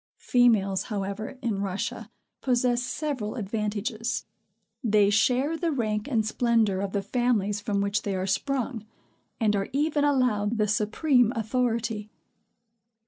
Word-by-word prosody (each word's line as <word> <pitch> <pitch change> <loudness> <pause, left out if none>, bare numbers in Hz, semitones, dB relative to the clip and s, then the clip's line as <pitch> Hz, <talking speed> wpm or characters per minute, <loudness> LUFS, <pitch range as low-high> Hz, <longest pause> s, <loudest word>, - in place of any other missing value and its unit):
Females, 215 -6 +3
however, 205 +3 -4
in 215 -5 -1
Russia, 205 +4 -3 0.3
possess 245 -1 +2
several 250 -3 -3
advantages. 215 +1 -2 0.6
They 210 -3 +4
share 255 +8 +2
the 330 0 -1
rank 215 -5 -1
and 225 -6 +1
splendor 220 -4 +2
of 200 -1 -3
the 200 -1 -1
families 210 -2 0
from 205 -2 -1
which 200 +1 0
they 200 -2 -2
are 185 0 -1
sprung, 250 +1 -1 0.6
and 215 -3 +2
are 195 -1 -1
even 295 +1 +1
allowed 240 -6 +2
the 215 -1 +2
supreme 230 +4 +2
authority. 225 -2 -1
220 Hz, 130 wpm, -27 LUFS, 205-250 Hz, 0.6 s, They